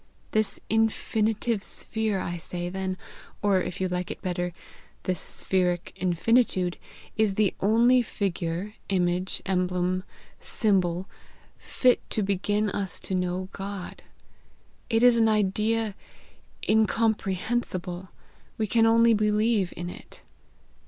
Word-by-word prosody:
This 215 -1 +1
infinitive 220 0 +1
sphere, 220 -1 -2
I 175 -1 -3
say 175 +1 -4
then, 190 0 -3 0.5
or, 195 -2 +3
if 180 +1 -4
you 190 - +1
like 180 0 -3
it - - -5
better, 180 -1 -1 0.5
this 180 -3 -1
spheric 180 -2 -1
infinitude, 185 +1 +2 0.4
is 215 -3 +2
the 210 -2 +2
only 235 +5 +5
figure, 190 -3 -3 0.2
image, 180 -1 0
emblem, 180 -1 0 0.4
symbol, 185 -4 +1 0.5
fit 250 -2 +3
to 215 - 0
begin 205 +2 0
us 195 -2 -3
to - - -4
know 180 0 -1
God; 195 -2 -6 0.9
it 225 0 +2
is 245 -1 +7
an 225 -1 +4
idea 215 +1 +1 0.7
incomprehensible; 210 -4 0 0.5
we 220 - +1
can 225 +2 +3
only 230 0 +5
believe 210 -2 +2
in 175 - -4
it. 180 - -11
195 Hz, 115 wpm, -27 LUFS, 180-220 Hz, 0.9 s, is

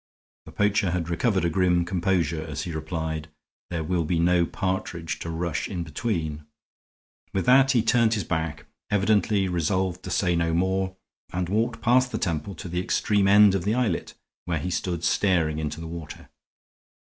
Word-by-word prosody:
The - - -9
poacher 105 -2 +1
had 85 -1 -2
recovered 95 +1 +1
a - - +2
grim 90 -1 +2
composure 85 -3 0
as 75 -4 -5
he 85 - -5
replied. 80 0 -4 0.4
"There 85 -2 -2
will 85 +1 0
be 85 +2 0
no 85 0 +3
partridge 85 -5 -3
to 85 - -5
rush 85 -1 -2
in 90 -3 -3
between." 80 -2 -3 0.9
With 95 -2 0
that 135 +1 +6
he 120 -3 +3
turned 115 -1 +3
his 105 - -1
back, 80 -3 -3 0.2
evidently 105 0 +2
resolved 90 +1 -1
to - - -7
say 90 -3 +1
no 85 -1 +1
more, 95 +1 0 0.4
and 90 -1 -2
walked 115 +3 0
past 125 +2 +3
the - - -2
temple 85 +2 -2
to 80 +3 -8
the 90 +1 -2
extreme 100 +2 +1
end 100 0 +7
of 95 -3 0
the 105 +3 +1
islet, 115 -9 -1 0.3
where 85 -2 -1
he 90 +5 -3
stood 85 -1 -2
staring 85 -7 +2
into 75 0 -4
the 80 - -6
water. 80 -1 -8
90 Hz, 175 wpm, -25 LUFS, 80-100 Hz, 0.9 s, end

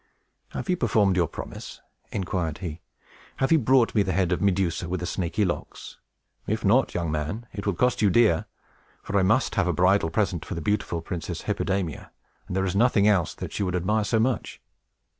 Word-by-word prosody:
"Have - - -4
you 180 -1 +1
performed 105 - +2
your 90 -3 +2
promise?" - - -8 0.3
inquired 90 -5 -2
he. 85 -3 -6 0.5
"Have 135 - 0
you 160 - +6
brought 125 -1 +3
me 105 - +3
the 95 -1 0
head 95 -2 +1
of 90 - 0
Medusa 90 -3 0
with 90 0 -2
the 90 - -4
snaky 90 +4 -1
locks? 85 - -5 0.5
If 110 +1 -1
not, 120 +7 +3
young 85 -3 -1
man, 75 +10 -3
it 100 +1 -5
will 100 - +1
cost 125 +5 +1
you 105 - +5
dear; 105 -5 +3 0.6
for 100 -1 0
I - - +3
must 110 +8 +2
have 100 -4 +1
a 90 - +1
bridal 90 -1 +3
present 90 -2 0
for 95 - -6
the - - -3
beautiful 85 -2 -1
Princess 85 -2 -5
Hippodamia, 95 -2 -2 0.4
and 90 - -4
there 95 0 +1
is 95 0 -2
nothing 105 -1 +4
else 95 -6 +2
that - - -7
she - - -3
would 90 -2 0
admire 105 +5 +1
so 110 +2 +1
much." 115 -4 -1
95 Hz, 200 wpm, -25 LUFS, 90-110 Hz, 0.6 s, you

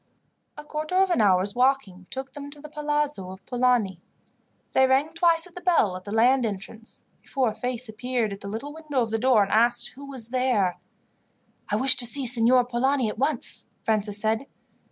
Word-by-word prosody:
A 300 - -8
quarter 305 +3 -4
of 380 0 +3
an 345 - +2
hour's 195 0 +3
walking 245 -8 0
took 265 0 -6
them 285 0 -8
to 290 +1 -13
the 300 +1 -10
palazzo 295 -9 -2
of 190 +1 -11
Polani. 245 -8 +1 0.7
They 265 0 +5
rang 270 +4 +2
twice 330 0 +3
at 360 - -13
the 360 - -9
bell 330 - +2
at 185 - -9
the 205 - -7
land 245 +4 +3
entrance, 215 +1 -6 0.2
before 260 -4 0
a - - -5
face 250 0 -2
appeared 225 -1 -2
at 195 - -10
the 200 - -7
little 230 +8 -6
window 300 -5 -2
of 225 - -5
the 225 - 0
door, 245 -3 +4
and 195 - -4
asked 240 +2 +2
who 280 +2 -11
was 250 -5 -8
there. 245 -8 +1 0.9
"I 210 - +1
wish 260 +4 +5
to 245 -1 +3
see 275 +2 0
Signor 245 +1 +4
Polani 250 0 0
at 210 - -7
once," 275 -1 0 0.2
Francis 210 -2 0
said. 220 +5 -1
250 Hz, 195 wpm, -25 LUFS, 220-280 Hz, 0.9 s, They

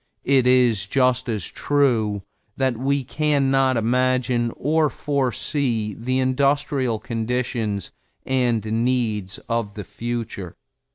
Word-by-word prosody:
It 130 -2 +4
is 120 -6 +3
just 130 +1 +2
as 105 -6 -2
true 115 -9 +1 0.3
that 130 -2 +1
we 135 +3 0
can 145 0 +1
not 135 -2 +3
imagine 125 0 +1
or 155 +2 +2
foresee 130 -5 -1
the 130 +5 -2
industrial 135 -2 +1
conditions 115 -3 -2 0.3
and 120 -4 +1 0.2
needs 110 -6 -1
of 115 -3 -2
the 105 - -5
future. 115 -6 -5
125 Hz, 110 wpm, -22 LUFS, 115-135 Hz, 0.3 s, It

